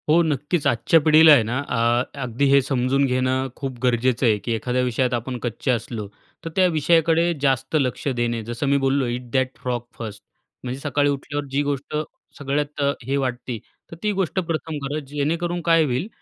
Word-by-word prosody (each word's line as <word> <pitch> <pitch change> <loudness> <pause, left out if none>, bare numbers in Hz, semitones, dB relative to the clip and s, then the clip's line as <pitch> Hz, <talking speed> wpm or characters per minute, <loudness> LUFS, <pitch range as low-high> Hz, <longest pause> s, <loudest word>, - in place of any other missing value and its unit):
हो. 165 +3 +6
नक्कीच 150 +1 -1
आजच्या 120 +7 +3
पिढीला 155 +1 +7
आहे 120 - +5
ना, 120 +4 -2
अ, 120 -3 +1 0.2
अगदी 125 +2 -1
हे 140 0 +6
समजून 135 +1 +1
घेणं 130 0 0
खूप 135 -3 -5
गरजेचं 125 +1 +2
आहे, 110 -3 +4
की 105 +4 -5
एखाद्या 125 +3 -1
विषयात 125 0 0
आपण 120 +2 -3
कच्चे 120 +2 -2
असलो 115 -3 -3 0.4
तर - - -3
त्या 185 - +4
विषयाकडे 165 +1 +3
जास्त 135 +2 0
लक्ष 130 +1 -2
देणे. 120 -3 -1
जसं 120 +5 -3
मी 140 +1 +3
बोललो 135 0 +1
इट 120 0 -4
दॅट 130 -1 0
फ्रॉग 125 -2 -2 0.2
फर्स्ट 105 -3 -7 0.4
म्हणजे 130 +1 -4
सकाळी 145 0 +1
उठल्यावर 145 +1 -3
जी 140 +1 +1
गोष्ट 145 +1 -3 0.4
सगळ्यात 145 +1 -2
अ, 140 0 +3
हे 135 +4 -1
वाटती. 125 -3 -3 0.3
तर - - -7
ती 210 - +2
गोष्ट 190 +1 -1
प्रथम 160 -3 -3
करा 145 +2 -2
जेणेकरून 165 +5 -1
काय 165 -1 +5
होईल? 130 +6 -1
135 Hz, 185 wpm, -22 LUFS, 125-150 Hz, 0.4 s, पिढीला